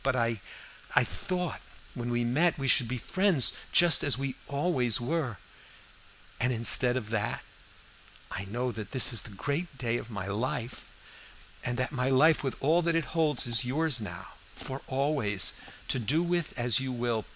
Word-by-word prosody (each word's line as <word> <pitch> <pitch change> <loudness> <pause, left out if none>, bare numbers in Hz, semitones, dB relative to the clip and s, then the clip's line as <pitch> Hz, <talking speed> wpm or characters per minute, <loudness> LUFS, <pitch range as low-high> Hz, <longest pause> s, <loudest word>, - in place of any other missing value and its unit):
But 135 -1 +1
I 115 -3 0 0.6
thought 180 -2 -4 0.3
when 120 -1 -5
we 120 0 0
met 155 +9 +1
we 135 -1 -3
should 125 -2 +4
be 125 +2 -3
friends 185 - +2 0.2
just 175 -1 +5
as 145 - +3
we 135 -1 -3
always 140 -6 +1
were, 130 - -2 1.0
and 125 +1 +1
instead 125 +1 +5
of 110 -3 -6
that 110 -3 -2 0.9
I 95 - -3
know 120 +5 -3
that 110 -3 -7
this 130 -1 +5
is 115 - 0
the - - -11
great 145 - -4
day 120 -2 -1
of 120 - -8
my 100 -5 -5
life, 115 +4 -4 0.7
and 120 0 -2
that 130 0 -1
my 130 -2 -1
life 150 +5 +4
with 135 - -2
all 160 +5 +3
that 170 -1 0
it 165 -1 -2
holds 155 -4 +2
is 120 0 +2
yours 140 0 0
now, 105 - -7 0.3
for 135 +1 -6
always, 130 - +1 0.4
to 130 - 0
do 145 +9 +1
with 175 -4 -2
as 120 +1 +2
you 135 -1 -3
will. 120 -3 -2
130 Hz, 175 wpm, -29 LUFS, 120-150 Hz, 1.0 s, just